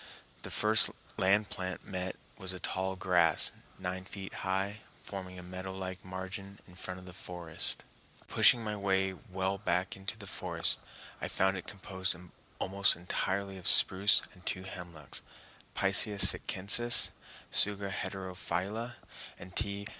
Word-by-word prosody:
The - - -7
first 110 0 +5 0.3
land 100 +2 +2
plant 95 -1 -5
met 95 -1 -5 0.2
was 95 -1 -7
a 90 - -8
tall 95 +1 -2
grass, 90 -4 +3 0.3
nine 95 0 -5
feet 95 0 -8
high, 95 +2 -2 0.2
forming 95 -2 -8
a 90 - -9
meadow 95 +1 -7
like 95 -1 -6
margin 95 +2 -8
in 90 - -16
front 90 0 -7
of 90 - -14
the 90 - -11
forest. 85 -3 -2 0.4
Pushing 120 -1 +5
my 105 -1 -3
way 95 -1 0
well 95 -1 -4
back 90 -1 -1
into 95 +2 -7
the 105 - -10
forest, 95 - -2 0.4
I - - -2
found 95 +1 +1
it 90 - -7
composed 95 -2 -4 0.4
almost 100 +1 +2
entirely 95 +2 -3
of 90 - -7
spruce 100 +1 +5
and 90 - -18
two 95 0 -2
hemlocks 85 -6 -7 0.5
(Picea 100 +2 +5
sitchensis, 115 +6 +7 0.4
Tsuga 100 -1 +3
heterophylla 95 +5 -4 0.4
and 90 +1 -12
_T. 100 -1 -2
95 Hz, 140 wpm, -31 LUFS, 90-100 Hz, 0.5 s, sitchensis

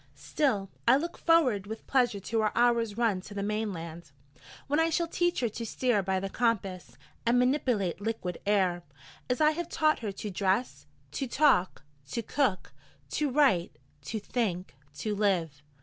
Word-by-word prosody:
Still, 210 -10 -1 0.2
I 240 - +7
look 340 +4 -4
forward 255 - +3
with 220 +1 -7
pleasure 245 -6 +2
to 225 +3 -1
our 215 -1 +1
hour's 235 -3 +2
run 220 -6 +1
to 205 +2 -11
the 200 - -2
Mainland, 180 -6 -4 0.6
when 290 +2 +1
I 325 0 +3
shall 340 +1 +1
teach 350 -1 0
her 240 - +1
to 230 - -6
steer 235 -1 +1
by 190 0 0
the 195 - -3
compass, 195 -5 -2 0.3
and 235 +1 +3
manipulate 245 - +1
liquid 200 -5 -3
air, 185 -4 +2 0.5
as 250 - 0
I 305 0 +5
have 340 +2 -4
taught 310 0 +2
her 215 -3 -3
to 205 +1 -6
dress, 185 - -1 0.2
to 265 - -3
talk, 240 - +2 0.3
to 235 - -3
cook, 220 -6 -1 0.4
to 300 -2 0
write, 250 - +2 0.3
to 220 - -3
think, 195 -5 -2 0.2
to 215 +7 -3
live. 180 -9 0
220 Hz, 165 wpm, -29 LUFS, 190-255 Hz, 0.6 s, I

